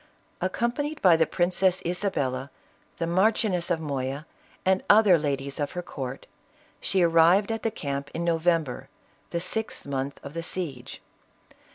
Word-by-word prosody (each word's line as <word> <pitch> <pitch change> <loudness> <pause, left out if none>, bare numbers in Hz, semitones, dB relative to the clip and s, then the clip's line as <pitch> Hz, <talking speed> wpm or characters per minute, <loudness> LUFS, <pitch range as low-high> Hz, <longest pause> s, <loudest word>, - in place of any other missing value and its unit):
Accompanied 285 +5 -1
by 180 -3 +7
the 160 -1 +3
Princess 180 +1 +2
Isabella, 140 -8 -1 0.5
the 165 - -1
Mar 185 +6 +4
chioness 185 -6 -1
of 170 -2 +1
Moya, 140 -1 -3 0.4
and 190 0 +3
other 205 -3 +7
ladies 140 -3 -2
of 145 -1 -2
her 180 -1 -4
court, 135 -5 -6 0.5
she 190 -2 +1
arrived 170 +5 +5
at 225 - -2
the 225 - 0
camp 140 -9 -4
in 170 - -2
November, 165 -5 0 0.4
the 170 - -2
sixth 220 +5 -3
month 140 0 -3
of 140 - -8
the 165 - -3
siege. 155 -8 -6
170 Hz, 150 wpm, -26 LUFS, 140-190 Hz, 0.5 s, by